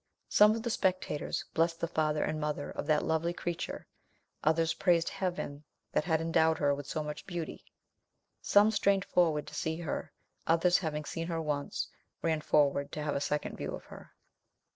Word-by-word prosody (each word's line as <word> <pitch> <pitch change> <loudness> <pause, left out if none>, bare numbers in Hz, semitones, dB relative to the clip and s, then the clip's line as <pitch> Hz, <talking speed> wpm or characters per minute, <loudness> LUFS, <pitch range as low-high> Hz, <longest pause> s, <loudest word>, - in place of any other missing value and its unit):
Some 210 +1 +6
of 225 - -4
the 235 - -1
spectators 185 -7 -1
blessed 165 0 +1
the 170 - -1
father 155 -2 +1
and 155 0 -2
mother 150 -1 -2
of - - -5
that 150 -1 +3
lovely 160 +2 +1
creature; 175 -1 -4 0.6
others 160 +1 +3
praised 170 -3 +2
Heaven 175 -6 -3 0.3
that 150 - +1
had 160 -2 +2
endowed 160 -1 +3
her 145 -2 +2
with 140 0 -5
so 155 - -2
much 150 0 -6
beauty. 175 -4 -5 0.8
Some 205 +2 +5
strained 200 -2 +2
forward 160 -6 +2
to - - -11
see 160 0 -2
her; 170 -2 -4 0.4
others, 170 +2 +4
having 150 -3 -3
seen 165 +1 -4
her 165 -2 -2
once, 150 -3 -2 0.4
ran 160 -2 +1
forward 140 -2 +2
to 150 - -3
have 150 -1 -1
a 140 - -1
second 150 +1 -2
view - - -3
of - - -11
her. - - -12
160 Hz, 180 wpm, -31 LUFS, 150-175 Hz, 0.8 s, Some